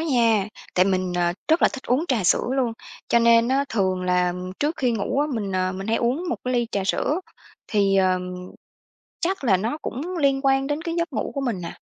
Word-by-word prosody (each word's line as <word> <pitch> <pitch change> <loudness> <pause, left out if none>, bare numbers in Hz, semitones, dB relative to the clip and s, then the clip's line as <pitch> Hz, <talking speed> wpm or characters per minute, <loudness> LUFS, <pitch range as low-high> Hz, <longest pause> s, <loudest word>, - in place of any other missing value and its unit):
nha. 230 -9 +2 0.3
Tại 180 - +5
mình, 185 -2 0
ờ, 175 0 +2 0.2
rất 320 +2 +3
là - - +7
thích 275 - -8
uống 260 +7 +2
trà 230 -8 +1
sữa - - +3
luôn, 245 -3 +1 0.4
cho 235 - +4
nên 230 0 +5
á, 275 +2 +2
thường 190 -4 0
là 180 -1 +2 0.3
trước 300 +3 0
khi 250 -2 +1
ngủ 230 +5 -1
á, 295 - +2
mình, 200 -4 -3
ờ, 185 0 0
mình 195 +2 -6
hay 225 - +1
uống 255 +9 0
một - - -1
cái 255 0 -1
ly 240 -1 +1
trà 195 -2 -1
sữa. 300 - 0 0.5
Thì, 200 -2 +2
ờ, 185 -1 +3 1.0
chắc 370 -3 -1
là 195 -7 +4
nó 230 +10 -2
cũng 340 +8 -4
liên 275 -3 +2
quan 270 0 +2
đến 295 +2 -2
cái 335 -1 -3
giấc 335 -3 -1
ngủ 225 - -2
của 275 - -1
mình 230 -9 -2
nà. 170 - -7
235 Hz, 225 wpm, -23 LUFS, 190-275 Hz, 1.0 s, là